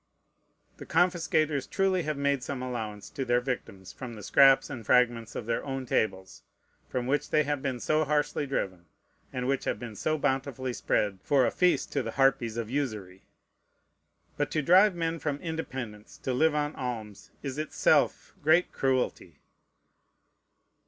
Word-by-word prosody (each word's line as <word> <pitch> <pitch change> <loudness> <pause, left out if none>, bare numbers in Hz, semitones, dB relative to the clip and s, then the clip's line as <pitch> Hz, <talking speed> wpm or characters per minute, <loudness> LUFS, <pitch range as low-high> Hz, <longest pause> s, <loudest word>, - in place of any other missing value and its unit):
The - - -9
confiscators 160 -5 +1
truly 190 -2 +1
have 155 -3 -3
made 140 -1 +1
some 130 0 -4
allowance 110 -5 -5
to 135 - -3
their 120 -1 +2
victims 115 -7 -5
from 125 -3 -8
the 105 - -10
scraps 135 +4 +6
and 120 -3 -7
fragments 120 -1 +2
of 115 - -4
their 115 0 -1
own 135 -1 -4
tables, 95 -5 -1 0.5
from 125 -1 -2
which 140 +3 0
they 155 - +3
have 145 -1 -2
been 130 -3 -2
so 155 +5 +1
harshly 150 -1 0
driven, 95 -10 -3 0.4
and 125 -2 -3
which 135 0 0
have - - -1
been 115 -3 -8
so 155 +8 0
bountifully 135 -3 -1
spread 100 -4 0
for 135 -3 +3
a - - +1
feast 180 -1 +2
to 140 - +1
the 115 -2 -5
harpies 125 -4 +2
of 115 -2 -2
usury. 110 -8 -4 1.1
But 145 0 0
to 155 0 -1
drive 185 +5 +6
men 165 -1 -2
from 145 -2 -2
independence 130 -10 -6
to 130 - -1
live 155 +4 +3
on 150 0 -1
alms 110 -5 -6
is 140 0 -4
itself 155 - +1
great 160 +4 +4
cruelty. 130 -2 -1
135 Hz, 160 wpm, -28 LUFS, 120-150 Hz, 1.1 s, scraps